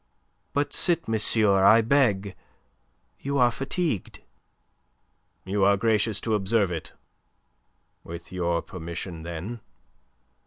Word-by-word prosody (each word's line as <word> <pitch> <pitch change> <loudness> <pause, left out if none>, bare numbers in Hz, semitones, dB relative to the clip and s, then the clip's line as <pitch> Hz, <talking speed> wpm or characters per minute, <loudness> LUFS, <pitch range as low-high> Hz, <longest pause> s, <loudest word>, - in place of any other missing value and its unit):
"But 145 +1 -1
sit, 170 -2 +2
monsieur, 110 -3 +3
I 110 +3 +7
beg. 110 -6 +1 0.8
You 140 +1 -2
are 120 -2 +4
fatigued." 135 - -3 1.2
"You 100 +1 0
are 100 +1 +4
gracious 110 0 +1
to 110 - -1
observe 105 -1 +1
it. 80 -2 -6 1.1
With 85 +1 -9
your 85 -2 -1
permission, 85 -1 -7
then." 85 +8 -6
105 Hz, 105 wpm, -25 LUFS, 90-115 Hz, 1.2 s, I